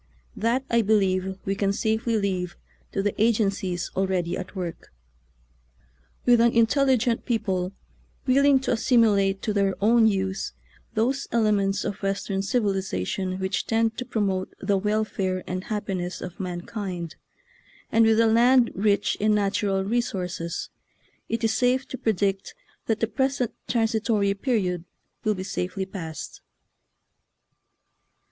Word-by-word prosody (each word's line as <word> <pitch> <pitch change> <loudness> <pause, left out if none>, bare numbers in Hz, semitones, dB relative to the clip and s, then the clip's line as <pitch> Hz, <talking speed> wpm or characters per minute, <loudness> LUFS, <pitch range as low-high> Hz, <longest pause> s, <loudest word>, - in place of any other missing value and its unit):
That, 240 +4 0
I 235 0 +3
believe, 190 -3 +1
we 195 - 0
can 195 0 0
safely 220 +2 0
leave 185 -3 -2 0.4
to 195 - -1
the 205 - 0
agencies 195 -5 +1
already 185 -2 0
at 190 +2 -7
work. 175 -3 -6 1.3
With 240 -2 +6
an 235 0 +4
intelligent 245 0 +3
people 195 -6 -1 0.5
will 270 +1 +4
ing 280 -2 +5
to - - -1
assimilate 215 -5 +3
to 215 - 0
their 195 -1 +1
own 225 +2 +5
use 190 -2 -1 0.4
those 260 +5 0
elements 205 -3 +2
of 205 -1 -4
Western 195 0 -1
civilization 190 - -1
which 190 0 -2
tend 225 0 +1
to - - -2
promote 195 -5 -1
the 200 +1 +1
welfare 195 -2 -1
and 185 +1 -4
happi 210 -3 -3
ness 180 0 -4
of 180 - -8
mankind, 180 -1 -5 0.8
and 225 0 +5
with 225 0 +4
a - - +4
land 235 +2 +5
rich 200 +1 +1
in 215 0 +3
natural 200 -1 +1
resources, 185 -6 -2 0.6
it 230 0 -2
is 225 -1 +2
safe 255 +3 +2
to 260 - -5
predict 200 -2 0 0.3
that 225 -1 0
the 225 - +2
present 260 +1 0
transitory 225 -3 +1
period 195 -6 -1 0.4
will 215 -1 +1
be 185 - -5
safely 190 0 -3
passed. 165 -5 -7
205 Hz, 135 wpm, -25 LUFS, 190-230 Hz, 1.3 s, With